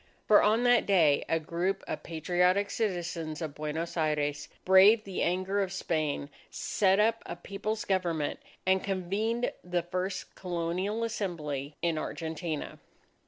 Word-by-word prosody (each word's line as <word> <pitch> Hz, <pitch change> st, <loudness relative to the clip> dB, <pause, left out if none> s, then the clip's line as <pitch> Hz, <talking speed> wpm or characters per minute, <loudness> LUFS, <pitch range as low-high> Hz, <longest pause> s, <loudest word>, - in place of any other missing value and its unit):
For 210 Hz, -, +7 dB
on 220 Hz, +3 st, +3 dB
that 245 Hz, -1 st, +4 dB
day 165 Hz, -8 st, +4 dB
a 165 Hz, -, +2 dB
group 170 Hz, +4 st, -2 dB
of -, -, -4 dB
patriotic 180 Hz, +5 st, +1 dB
citizens 175 Hz, -7 st, -2 dB
of 160 Hz, -4 st, -4 dB
Buenos 155 Hz, +3 st, -4 dB
Aires 150 Hz, -2 st, -1 dB, 0.2 s
braved 200 Hz, +4 st, +7 dB
the 195 Hz, -2 st, -4 dB
anger 185 Hz, +3 st, +1 dB
of 190 Hz, -2 st, -2 dB
Spain, 155 Hz, -6 st, -2 dB, 0.2 s
set 195 Hz, -1 st, +1 dB
up 225 Hz, +2 st, +3 dB
a -, -, -4 dB
People's 205 Hz, +5 st, -4 dB
Government, 170 Hz, -6 st, 0 dB, 0.3 s
and 190 Hz, 0 st, +3 dB
convened 200 Hz, +5 st, -1 dB
the 180 Hz, -1 st, -1 dB
first 185 Hz, +2 st, -4 dB
Colonial 180 Hz, +5 st, -2 dB
Assembly 155 Hz, -10 st, -3 dB
in 165 Hz, -2 st, +1 dB
Argentina. 160 Hz, -1 st, -4 dB
180 Hz, 135 wpm, -29 LUFS, 160-200 Hz, 0.3 s, For